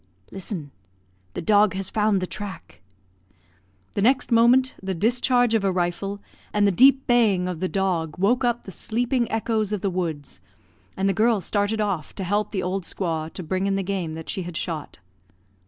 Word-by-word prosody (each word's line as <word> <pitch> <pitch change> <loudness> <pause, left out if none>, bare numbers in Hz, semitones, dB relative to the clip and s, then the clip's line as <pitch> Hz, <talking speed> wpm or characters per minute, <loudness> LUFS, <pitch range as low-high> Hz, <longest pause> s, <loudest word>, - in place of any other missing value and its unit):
"Listen; 180 -6 -6 0.6
the - - -4
dog 205 0 +4
has 190 -1 -4
found 210 -3 +2
the - - 0
track." 195 +3 -8 1.1
The - - -1
next 255 +4 +2
moment 245 +3 +5
the 190 -1 -3
discharge 245 +4 +2
of 220 -3 +2
a 195 - +2
rifle, 185 +3 -2 0.3
and 205 0 +2
the 200 - +4
deep 265 +7 +5
baying 215 -7 +3
of 180 -3 -4
the 185 - 0
dog, 180 -5 -1
woke 235 +8 +2
up 240 -1 0
the 195 - -9
sleeping 235 +5 -1
echoes 220 -2 0
of 210 -3 -2
the 195 - 0
woods; 160 - -4 0.6
and 190 +1 +1
the 195 - +2
girl 220 +2 +3
started 205 +4 -1
off 195 -8 -2
to 195 - -4
help 205 +3 0
the 190 -3 -2
old 190 +2 -1
squaw 165 -3 -3
to 185 - -6
bring 185 +4 -1
in 195 - +1
the 195 - -1
game 180 -4 -3
that 160 0 -8
she 195 - -3
had 175 -2 -6
shot. 160 -5 -4
195 Hz, 190 wpm, -24 LUFS, 180-220 Hz, 1.1 s, moment